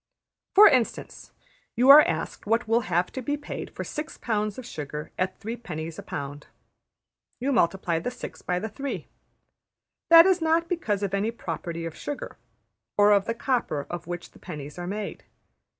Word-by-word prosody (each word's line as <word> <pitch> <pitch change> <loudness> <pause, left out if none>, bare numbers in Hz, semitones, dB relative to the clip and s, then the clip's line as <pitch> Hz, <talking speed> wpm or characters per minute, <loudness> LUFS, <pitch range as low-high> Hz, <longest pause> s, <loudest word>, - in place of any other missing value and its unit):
For 420 +2 +10
instance, 255 - 0 0.4
you 250 +3 +4
are 295 +2 +11
asked 165 - -3
what 225 +1 +1
will 225 +1 +3
have 175 +1 +1
to 260 - -5
be 290 +4 -1
paid 295 - -6
for - - -6
six 305 +1 -6
pounds 210 -3 -1
of 255 - -7
sugar 150 - -6
at 185 +1 -2
3d.\ 175 -8 -6
a - - -7
pound. 145 +1 -6 0.9
You 265 +3 0
multiply 175 -7 +1
the 170 - -3
six 250 - -9
by 180 - -1
the 210 +5 -3
three. 270 +6 -5 1.0
That 330 0 +10
is 375 -2 +3
not 325 +1 +2
because 215 - -1
of 195 -1 -2
any 200 +3 +1
property 170 -6 -5
of 165 -1 -6
sugar, 290 - -6 0.6
or 205 0 +6
of 200 -1 +4
the 230 - -2
copper 230 - -1
of 175 -1 -6
which 175 0 -6
the - - -18
pennies 150 -2 -8
are 175 - -5
made. 205 +2 -5
210 Hz, 175 wpm, -26 LUFS, 170-255 Hz, 1.0 s, are